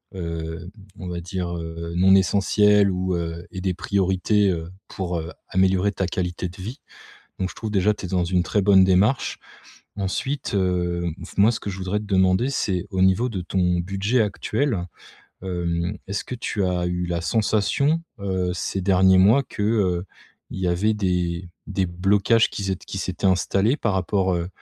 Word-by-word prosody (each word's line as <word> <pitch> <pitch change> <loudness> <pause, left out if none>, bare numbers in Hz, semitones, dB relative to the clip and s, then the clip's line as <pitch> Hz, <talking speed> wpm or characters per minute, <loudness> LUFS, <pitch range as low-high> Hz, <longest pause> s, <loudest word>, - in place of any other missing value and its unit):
heu, 85 0 -5 0.3
on 90 - -7
va 85 -1 -4
dire, 90 -1 -4
heu, 85 0 -6
non 95 +2 +5
essentielles, 100 +1 +4
ou 90 0 -1
heu 85 0 -4
et 95 - -6
des 95 -1 0
priorités, 100 +2 +1
heu, 85 0 -4 0.2
pour 90 -2 -3
heu, 80 +2 -5 0.2
améliorer 95 +1 +2
ta 95 - -1
qualité 90 0 -3
de 95 +2 -12
vie. 120 +9 -6 0.6
Donc 95 0 -2
je - - -17
trouve 110 - -5
déjà 100 +1 +3
que - - -5
tu - - -6
es - - -9
dans 90 -2 +1
une 90 0 +1
très 105 +3 0
bonne 95 -2 +6
démarche. 95 +7 +2 0.6
Ensuite, 105 +6 -2
heu 90 -2 0
f - - -11
moi 105 +3 +5
ce - - -4
que - - -6
je 95 - -6
voudrais 95 +2 -2
te 105 - -7
demander 95 +4 +2
c'est 95 -9 -1
au 95 -1 0
niveau 95 +7 +3
de 95 -6 -4
ton 90 -1 0
budget 100 +6 0
actuel, 105 0 -1 0.6
hem, 85 +1 -2
est-ce 100 +1 -3
que 125 - -6
tu 105 -4 -2
as 90 -1 0
eu 90 0 -2
la 85 -1 -2
sensation, 115 - +1 0.2
heu, 95 -2 -1
ces 95 +1 -3
derniers 95 0 +5
mois 110 +9 +5
que, 105 - -6
heu, 95 -5 +1 0.5
il - - -6
y 90 - 0
avait 100 +5 +2
des, 90 -3 -1 0.2
des 95 -2 -1
blocages 100 +6 +2
qui 100 - -5
z 95 - -1
ét 95 - -6
qui 95 - -6
s'étaient 95 +1 -2
installés 95 +7 +2
par 105 -4 0
rapport, 95 0 +1
heu, 85 +1 -2
95 Hz, 190 wpm, -23 LUFS, 90-100 Hz, 0.6 s, bonne